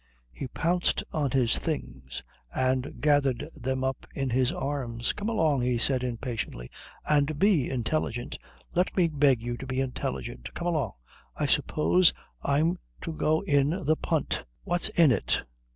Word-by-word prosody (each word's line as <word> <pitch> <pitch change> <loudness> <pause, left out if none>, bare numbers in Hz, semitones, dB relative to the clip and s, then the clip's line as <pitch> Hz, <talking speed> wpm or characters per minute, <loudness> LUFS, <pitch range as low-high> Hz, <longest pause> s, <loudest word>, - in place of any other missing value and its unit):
He 95 - -6
pounced 175 +6 +1
on 150 -3 +1
his 125 -2 +2
things 65 - -4 0.3
and 130 - 0
gathered 145 -2 +2
them 130 -2 -2
up 130 0 -2
in 135 -2 -1
his 125 +1 +3
arms. 125 -4 -2
"Come 210 +2 -3
along," 160 - +2
he 125 0 +1
said 130 +1 +2
impatiently, 115 - -4 0.4
"and 150 0 +2
be 180 - +3
intelligent. 120 -1 -2 0.3
Let 180 +3 +1
me 180 -2 +5
beg 140 -6 +3
you 120 0 -3
to 135 - -7
be 130 0 -1
intelligent. 65 - -3
Come 170 - -4
along. 165 -4 0 0.4
I 150 - 0
suppose 155 +5 +4 0.3
I'm 160 +6 +2 0.2
to 165 - -4
go 155 0 +1
in 145 -7 +3 0.2
the 155 +2 +4
punt. 160 -2 -1 0.2
What's 175 0 +2
in 165 -5 +5
it? - - +1
140 Hz, 150 wpm, -28 LUFS, 125-155 Hz, 0.4 s, me